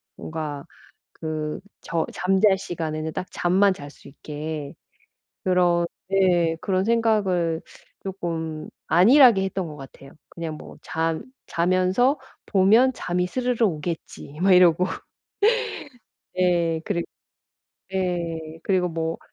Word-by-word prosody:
뭔가 155 -2 -5 0.5
그 155 -1 -4 0.2
저 165 -1 -1
잠잘 190 +1 +3
시간에는 160 -3 -4
딱 185 - -3
잠만 190 +3 +3
잘 145 -6 -8
수 - - -16
있게. 150 0 -6 0.7
그런 175 -2 +3 0.2
네 175 -4 +3
그런 190 0 0
생각을 200 -7 +1 0.4
쪼끔 165 -5 -4 0.2
안일하게 215 - +6
했던 190 -2 -2
것 150 -1 -9
같아요. 135 0 -12 0.2
그냥 165 -2 -6
뭐 - - -11
'잠 160 0 -2 0.2
자면서 185 - +2 0.3
보면 220 +7 +4
잠이 180 -5 -1
스르르 245 +1 0
오겠지.' 160 -4 -4
막 195 +1 +4
이러고. 180 -1 +6 1.5
예. 170 -3 +2
그리고 170 -1 -2 0.9
예 170 -4 -3
그리고 185 -2 +2
뭐 165 0 -3
175 Hz, 210 characters per minute, -24 LUFS, 160-190 Hz, 1.5 s, 안일하게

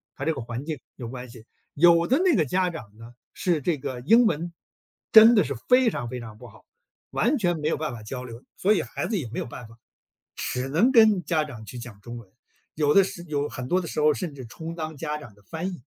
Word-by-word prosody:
它 135 - -5
这 160 - +1
个 135 - -6
环 120 +4 -6
境 155 -4 -4 0.2
有 120 - -7
关 125 0 -8
系。 115 -2 -13 0.3
有 170 +2 +5
的 265 +5 +3
那 365 -4 +3
个 - - +3
家 180 +6 +1
长 110 -11 -10
呢， 115 +2 -12 0.2
是 170 -5 0
这 155 +1 0
个 130 -2 -5
英 230 - +5
文 170 -4 -1 0.6
真 220 +1 +9
的 205 - +5
是 - - -3 0.2
非 250 -1 +6
常 120 -1 -4
非 125 0 -5
常 110 -3 -10
不 125 - -11
好， 110 -1 -18 0.5
完 255 +7 +1
全 175 -7 0
没 150 - -2
有 - - 0
办 155 -5 -3
法 115 - -8
交 125 +4 -6
流， 120 +1 -10
所 205 +3 +3
以 - - +1
孩 - - -5
子 220 - -1
也 125 -9 -4
没 120 - -5
有 - - -3
办 120 -1 -9
法， 115 +1 -17 0.6
只 125 +1 -3
能 195 - +3
跟 220 -6 +5
家 160 -3 +1
长 120 -7 -9
去 110 +4 -9
讲 115 -4 -10
中 120 +1 -8
文， 115 -4 -12 0.5
有 150 -1 +1
的 195 - +7
时 170 -2 -6
有 145 -1 -1
很 125 -3 -6
多 180 +5 +2
的 175 - -5
时 - - -4
候 150 0 +5
儿 150 - +4
甚 175 -5 -4
至 130 -3 -9
充 160 +7 -7
当 160 -2 -6
家 150 +2 -3
长 120 -8 -12
的 105 - -24
翻 165 - -4
译。 170 -10 -10
150 Hz, 280 characters per minute, -25 LUFS, 120-175 Hz, 0.6 s, 真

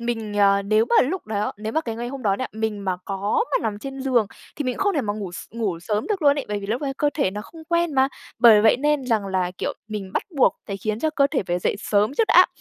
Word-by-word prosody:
mình 225 -3 -3
ờ, 200 0 +4
nếu 215 +2 +3
mà 235 - +3
lúc 375 +4 -4
đó 210 -1 -2
nếu 215 +1 -5
mà 315 - +1
cái 230 -7 -5
ngày 240 +1 -4
hôm 270 0 -7
đó 200 -3 +2
nha, 255 - -2
mình 215 -2 -3
mà 185 -2 0
có 200 - 0
mà - - +1
nằm 205 -1 -2
trên 270 +3 -7
giường 255 -5 +2 0.3
thì 295 - -3
mình 255 -1 -1
cũng - - -1
không 405 0 +1
thể 295 - +2
mà 205 -5 -2
ngủ 200 -4 -6
s - - -7
ngủ 215 -6 -2
sớm 210 +3 -2
được 405 -5 -2
luôn 285 0 +4
ấy, 280 - -3
bởi 210 - -2
vì 200 - -7
lúc 235 +7 -2
ấy 275 -1 -2
cơ 290 +1 +1
thể 280 -11 +1
nó 205 - -5
không 320 +6 -13
quen 340 -2 +1
mà. 265 0 +4 0.3
Bởi 225 -3 +8
vậy 220 - +5
nên 295 0 +1
rằng 220 -4 +1
là, 185 -2 0
kiểu, - - -2 0.2
mình 205 -3 -5
bắt - - 0
buộc 265 - +4
phải 200 - -4
khiến 215 +2 -3
cho 315 - +1
cơ 285 -2 +3
thể 270 - 0
phải 175 0 0
dậy 180 - -1
sớm 210 +2 +1
trước 450 - +3
đã. - - +7
225 Hz, 295 wpm, -23 LUFS, 205-275 Hz, 0.3 s, Bởi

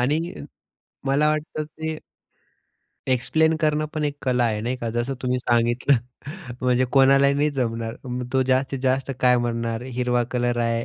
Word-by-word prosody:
आणि 145 +6 +2 0.9
मला 140 +3 +3
वाटतं 155 0 -2
ते 160 +1 -5 1.1
एक्सप्लेन 160 +6 +2
करणं 155 -1 +1
पण 155 -1 -1
एक 145 -1 -2
कला 125 -2 +2
आहे, 110 -2 0
नाही 120 +4 -2
का, 120 -2 -4
जसं 120 +4 -2
तुम्ही 125 0 0
सांगितलं. 120 +2 +2 0.6
म्हणजे 125 0 +2
कोणालाही 135 0 +5
नाही 145 +2 +2
जमणार. 115 -4 -2
म 125 0 -3
तो 130 0 +3
जास्तीत 130 +1 0
जास्त 130 +1 +1
काय 125 -1 +5
म्हणणार 115 -1 -2
हिरवा 125 -1 0
कलर 120 -1 0
आहे 115 0 -1
130 Hz, 155 wpm, -23 LUFS, 120-140 Hz, 1.1 s, कोणालाही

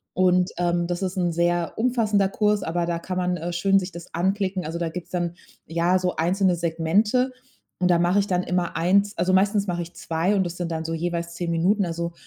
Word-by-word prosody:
Und, 180 0 +3
ähm, 175 -1 +1
das 175 +2 -3
ist 185 +1 -3
'n 175 -2 +1
sehr 170 0 0
umfassender 220 -5 +2
Kurs, 210 0 +1
aber 170 +1 -1
da 170 -1 -1
kann 185 +1 -5
man, 180 0 0
äh, 175 +1 -4
schön 195 +3 +3
sich 185 -1 -6
das 170 +1 -11
anklicken. 190 +1 0
Also, 165 +2 -4
da 170 -1 -1
gibt's 175 +1 -7
dann 175 -1 -2 0.3
ja, 170 +3 +2
so 180 -1 -1
einzelne 185 +3 +2
Segmente 175 +10 +1 0.5
und 180 - +2
da 175 - +5
mache 175 +3 +3
ich 200 - 0
dann 180 -1 0
immer 180 -2 -1
1 200 +4 +2
also 180 +2 +1
meistens 200 +1 +3
mach 175 -1 -2
ich 170 0 -6
2 170 +5 0
und 190 - +2
das 175 - -5
sind 175 -2 -3
dann 160 0 -3
so 165 - -3
jeweils 170 0 -3
10 175 -1 -3
Minuten. 185 +5 +2
Also, 170 0 -3
175 Hz, 225 wpm, -24 LUFS, 170-190 Hz, 0.5 s, da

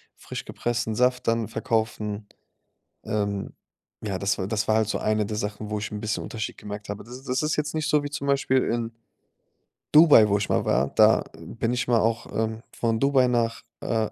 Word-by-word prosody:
frisch - - -7
gepressten 120 -2 -2
Saft 125 +1 +1
dann 115 -1 +1
verkaufen. 110 -2 -2 0.8
Ähm, 100 -2 -2 0.5
ja, 100 -3 -2
das 100 +1 0
war 95 - -2
das 105 0 -1
war 110 - +4
halt 110 -2 +2
so - - -1
eine 110 -1 0
der 105 0 -4
Sachen, 105 0 -4
wo 105 - -1
ich 105 - -4
'n 105 - -4
bisschen 110 -1 -2
Unterschied 110 -1 -5
gemerkt 105 0 -7
habe. 100 0 -5
Das 125 +3 -10
das 130 +2 -1
ist 150 0 0
jetzt 150 0 -2
nicht 155 -1 -1
so 150 -1 +3
wie 145 - -4
zum 140 -1 -4
Beispiel 135 -1 +2
in 115 0 -2 1.0
Dubai, 150 -8 +8
wo 100 - +3
ich 100 - -3
mal - - +1
war. 70 - +2
Da - - +6 0.2
bin 115 +2 -3
ich 125 0 -1
mal 120 -2 +4
auch, 115 +1 0
ähm, 110 0 -2
von 115 -1 -1
Dubai 135 -2 +4
nach, 115 -2 0 0.2
äh, 110 -2 0
115 Hz, 205 wpm, -25 LUFS, 105-125 Hz, 1.0 s, Dubai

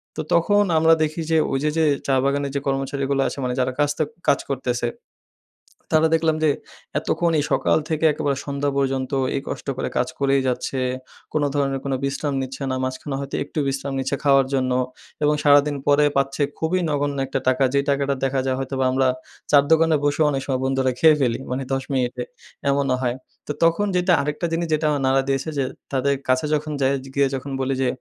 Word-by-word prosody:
তো - - -2
তখন 205 +5 +4
আমরা 160 +1 +5
দেখি 155 +2 -2
যে 160 - +4
ওই 135 - 0
যে, 150 - +2
যে 160 - +3 0.2
চা 135 - +3
বাগানের 140 0 0
যে 140 - +1
কর্মচারীগুলো 135 0 -1
আছে - - -5
মানে 125 0 -1
যারা 130 0 +1
কাজটা, 145 +1 +1 0.2
কাজ 140 - +4
করতেছে, 125 -3 -1 1.1
তারা 155 +1 +5
দেখলাম 160 -1 +2
যে, 155 - +4 0.5
এতক্ষণ 170 -1 0
এই 145 - 0
সকাল - - +3
থেকে 160 0 0
একেবারে 140 -1 -1
সন্ধ্যা 140 0 -1
পর্যন্ত 135 -1 0 0.2
এই - - -1
কষ্ট - - -6
করে - - -2
কাজ 125 - +1
করেই 140 -1 +2
যাচ্ছে, 130 +1 -2 0.5
কোনো 150 -2 +1
ধরনের 135 -1 0
কোনো 135 -1 0
বিশ্রাম 140 +1 -2
নিচ্ছে 130 +1 -6
না - - 0
মাঝখানে 130 +2 -4
হয়তো 140 0 -5
একটু 150 - -5
বিশ্রাম 135 0 -3
নিচ্ছে 135 +1 -1
খাওয়ার 135 -2 +5
জন্য 130 -1 +1 0.5
এবং 150 - +4
সারাদিন 145 0 +5
পরে 145 +1 +5
পাচ্ছে 140 +1 0 0.2
খুবই 170 +3 +1
নগণ্য 145 -1 -1
একটা 135 - -2
টাকা, 130 +1 +3
যে 140 - +3
টাকাটা 140 0 +1
দেখা 135 0 +1
যায়, 130 0 0
হয়তোবা 135 0 -1
আমরা 130 0 +2 0.4
চা-র 145 -1 +6
দোকানে 160 0 +5
বসে 145 +2 +1
অনেক 135 - -1
সময় 130 -2 -1
বন্ধুরা 135 -1 +1
খেয়ে 160 -2 +6
ফেলি, 120 -2 +1
মানে 130 +2 -2
১০ 135 - -1
মিনিটে, 125 -1 -1 0.5
এমনও 140 -2 +2
হয়, 125 0 0 0.3
তো - - -2
তখন 170 +5 +3
যেটা, 180 0 +3
আরেকটা 150 +4 -2
জিনিস 170 +1 -1
যেটা 155 +1 +1
আমার 145 -2 -1
নাড়া 135 +1 +3
দিয়েছে 135 +3 -1
যে, 140 - +2 0.3
তাদের 140 +1 +2 0.2
কাছে 130 +2 +2
যখন, 150 0 -1
যাই 135 0 +3 0.2
গিয়ে 140 -1 +3
যখন 135 +1 -6
বলি 130 +1 0
যে, 130 - +2
140 Hz, 195 wpm, -22 LUFS, 135-150 Hz, 1.1 s, চা-র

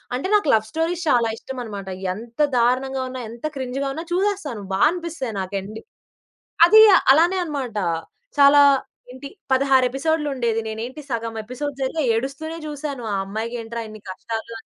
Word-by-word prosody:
అంటే 265 +9 -2
నాకు 410 -8 +2
లవ్‌స్టోరీస్ 325 +11 -1
చాలా 240 -3 +3
ఇష్టం 265 - -8
అన్నమాట. 200 -4 -7 0.3
ఎంత 230 +5 -11 0.2
దారుణంగా 260 +3 +1
ఉన్నా, 255 -1 -6
ఎంత 235 +5 -9
క్రింజ్‌గా 270 +1 -3
ఉన్నా, 320 +3 -5
చూసేస్తాను 365 - -1
బా 190 - 0
అనిపిస్తాది 330 - -5
నాకు 190 +1 -5
ఎండ్ 215 +3 -8 0.9
అది 435 +5 +7 0.3
అలానే 340 +6 +4
అన్నమాట. 275 -9 -4 0.6
చాలా 285 +1 +8 0.5
ఏంటి, 260 +2 -9 0.2
16 265 -1 +4
ఎపిసోడులు 300 +3 -1
ఉండేది, 230 -3 0
నేనేంటి, 230 +6 -6
సగం 230 -1 -3
ఎపిసోడ్స్ 270 +5 -5
జరిగా 310 +5 -1
ఏడుస్తూనే 275 +7 -4
జూసాను. 285 -4 -5
ఆ - - +1
అమ్మాయికి 220 +4 -4
ఏంట్రా 230 0 -5
ఇన్ని 215 0 -11
కష్టాలు 225 +4 -6
అని. - - -14
260 Hz, 150 wpm, -22 LUFS, 230-295 Hz, 0.9 s, చాలా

